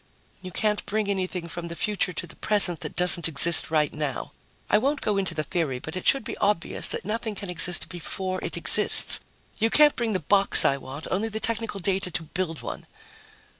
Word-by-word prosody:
"You 185 - -8
can't 210 +2 -1
bring 215 0 -2
anything 185 -3 -3
from 170 0 -7
the 170 - -8
future 205 0 -1
to 165 - -4
the - - -12
present 200 -6 +2
that - - -7
doesn't 180 -1 +3
exist 165 +2 +5
right 155 -2 0
now. 150 -3 -4 0.4
I 210 - +3
won't 280 +5 -1
go 210 - -1
into 185 -3 0
the 155 - -2
theory, 150 -4 -3
but 160 +6 -9
it 185 - -5
should 275 - +4
be - - -6
obvious 200 -4 -1
that - - +1
nothing 220 +1 -4
can 195 -2 -6
exist 180 0 +4
before 185 +2 -5
it - - -5
exists. - - +3 0.4
You 225 +1 +2
can't 300 +4 +5
bring 230 -3 -2
the 185 - -1
box 195 +5 +3
I 140 - +2
want, 135 +3 -10
only 210 +4 -1
the 220 0 -5
technical 225 -2 -2
data 190 +1 -2
to 170 -1 -4
build 165 0 -4
one." - - -8
185 Hz, 205 wpm, -24 LUFS, 165-210 Hz, 0.4 s, exist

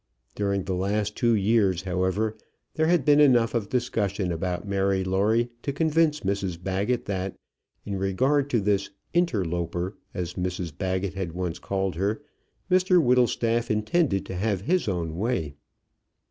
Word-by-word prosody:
During 100 -1 -1
the 95 - -3
last 100 +3 -1
two 115 -1 +3
years, 100 -3 +2
however, 95 +4 0 0.4
there 160 0 +1
had 170 -5 +3
been 145 0 +5
enough 120 -6 +5
of 115 -4 -1
discussion 105 -7 -1
about 90 +3 -3
Mary 95 -1 +1
Lawrie 105 +6 +1
to 140 - -2
convince 155 +1 +2
Mrs 95 -3 -2
Baggett 95 +7 -1
that, 95 -1 -3 0.5
in 100 -2 -3
regard 130 +9 +1
to 120 -5 +1
this 100 -1 +1 0.2
"interloper," 90 - -1 0.2
as 90 -2 -4
Mrs 90 -3 -3
Baggett 95 +1 -2
had 95 -4 -4
once 90 -1 -3
called 95 -1 -2
her, 100 +4 0 0.5
Mr 185 0 +5
Whittlestaff 120 -3 +2
intended 110 - +1
to 95 - -6
have 100 0 0
his 180 - +1
own 85 -4 -2
way. 95 - -1
100 Hz, 145 wpm, -26 LUFS, 95-120 Hz, 0.5 s, been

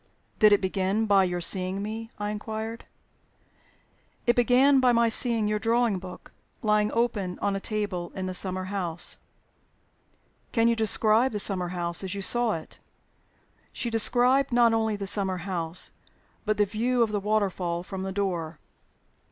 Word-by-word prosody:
"Did 215 -1 +6
it 205 - +4
begin 190 +3 -1
by 200 -2 +4
your 175 -1 -3
seeing 185 +2 -1
me?" 225 +2 -6
I 205 0 -3
inquired. 220 +2 -6 1.4
"It 240 - +3
began 255 +3 +4
by 255 -1 +4
my 235 -1 +3
seeing 225 -1 +3
your 210 0 -1
drawing 230 -3 +1
book 180 0 -11 0.3
lying 210 -1 +2
open 215 -6 -1
on 200 -1 -1
a - - -2
table 195 -5 -3
in 185 -1 -4
a 185 - -4
summer 185 0 0
house." 185 -3 -2 1.4
"Can 230 -1 +3
you 235 - +3
describe 220 +2 +3
the 210 - -1
summer 190 -3 +2
house 175 0 -2
as 190 +1 -4
you 200 - -5
saw 240 +1 +2
it?" 160 - -8 0.9
She 235 - -3
described 250 +4 +2
not 240 -1 +4
only 220 -1 0
the 200 -1 -5
summer 190 -1 +2
house, 175 -2 -4 0.5
but 215 0 0
the 205 - +3
view 235 +4 0
of 220 - -2
the 210 - -1
waterfall 190 -4 -1
from 190 0 -7
the 190 0 -4
door. 175 -5 -3
210 Hz, 160 wpm, -26 LUFS, 185-225 Hz, 1.4 s, Did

